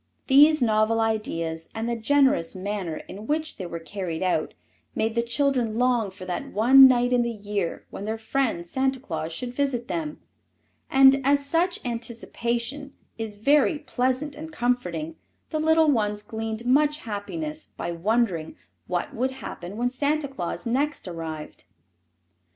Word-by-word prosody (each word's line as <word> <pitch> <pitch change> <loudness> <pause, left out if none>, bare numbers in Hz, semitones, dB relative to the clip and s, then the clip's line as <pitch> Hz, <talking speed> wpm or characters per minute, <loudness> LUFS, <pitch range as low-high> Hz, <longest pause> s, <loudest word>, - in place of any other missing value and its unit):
These 295 +1 +6
novel 220 0 +2
ideas 165 -8 -2
and 225 +1 -2
the 235 - 0
generous 235 -7 +2
manner 185 -4 -4
in 210 +3 -9
which 310 +1 -1
they 185 - -5
were 170 - -5
carried 170 0 -4
out 185 - 0 0.4
made 220 0 0
the 235 - +2
children 235 -2 0
long 245 -4 +2
for 190 -1 -10
that 180 -1 -4
one 265 +6 +8
night 245 -1 +2
in 245 - +4
the 235 - 0
year 205 -5 -3
when 200 - -6
their 220 +1 -2
friend 220 -5 -1
Santa 265 +7 0
Claus 160 - -4
should 245 +9 -5
visit 255 -3 -1
them, 310 -2 -3 0.7
and 270 0 +6
as 280 +1 +3
such 340 +4 0
anticipation 235 +3 -3 0.3
is 220 -2 -4
very 285 - +3
pleasant 270 0 -1
and 315 +2 -8
comforting 180 - -1 0.3
the 310 - -1
little 320 0 +4
ones 210 -4 0
gleaned 220 +1 -5
much 295 +4 +3
happiness 305 +9 -5
by - - -3
wondering 180 -2 0 0.3
what 175 - -2
would 255 +3 0
happen 205 -7 -8
when 245 +1 +1
Santa 285 +3 0
Claus 260 -9 -5
next 275 +1 -1
arrived. 160 -3 -7
235 Hz, 150 wpm, -25 LUFS, 205-275 Hz, 0.7 s, one